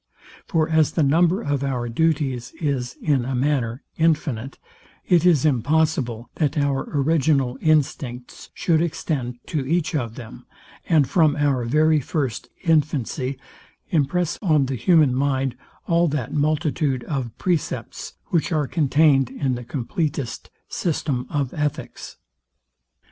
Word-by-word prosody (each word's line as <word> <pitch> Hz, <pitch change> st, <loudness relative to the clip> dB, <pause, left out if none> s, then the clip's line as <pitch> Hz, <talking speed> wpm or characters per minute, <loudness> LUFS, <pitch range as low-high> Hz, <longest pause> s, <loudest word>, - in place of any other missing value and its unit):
For 160 Hz, -3 st, +1 dB
as 160 Hz, -2 st, +2 dB
the 160 Hz, -, +2 dB
number 170 Hz, +8 st, +3 dB
of 145 Hz, -1 st, -1 dB
our 125 Hz, -3 st, -2 dB
duties 135 Hz, -2 st, 0 dB
is, 135 Hz, -6 st, -2 dB
in 140 Hz, -5 st, +2 dB
a 130 Hz, +1 st, -3 dB
manner, 130 Hz, -2 st, 0 dB
infinite, 145 Hz, -6 st, 0 dB, 0.5 s
it 175 Hz, -1 st, +4 dB
is 160 Hz, -5 st, +4 dB
impossible 140 Hz, -3 st, +1 dB
that 150 Hz, -2 st, 0 dB
our 140 Hz, -2 st, 0 dB
original 140 Hz, -3 st, +1 dB
instincts 140 Hz, -5 st, -1 dB
should 160 Hz, -2 st, +2 dB
extend 140 Hz, -7 st, -2 dB
to 150 Hz, -4 st, -2 dB
each 165 Hz, +5 st, 0 dB
of 120 Hz, -7 st, -2 dB
them, 115 Hz, -3 st, -11 dB, 0.4 s
and 155 Hz, -5 st, +4 dB
from 155 Hz, -3 st, +3 dB
our 140 Hz, -4 st, +1 dB
very 155 Hz, +5 st, +3 dB
first 135 Hz, -3 st, -3 dB
infancy 140 Hz, -4 st, 0 dB, 0.5 s
impress 165 Hz, +2 st, 0 dB
on 155 Hz, -8 st, +3 dB
the 130 Hz, 0 st, -3 dB
human 155 Hz, -1 st, +4 dB
mind 135 Hz, -1 st, 0 dB, 0.3 s
all 170 Hz, 0 st, +3 dB
that 140 Hz, -3 st, -3 dB
multitude 150 Hz, -3 st, 0 dB
of 125 Hz, -4 st, -4 dB
precepts, 175 Hz, -5 st, -3 dB, 0.2 s
which 170 Hz, 0 st, 0 dB
are 155 Hz, -3 st, +1 dB
contained 145 Hz, -3 st, +3 dB
in 135 Hz, 0 st, -2 dB
the 125 Hz, 0 st, -5 dB
compleatest 140 Hz, -, -3 dB, 0.2 s
system 135 Hz, -6 st, -2 dB
of 140 Hz, -4 st, -2 dB
ethics. 150 Hz, -1 st, -4 dB
145 Hz, 130 wpm, -22 LUFS, 130-160 Hz, 0.5 s, it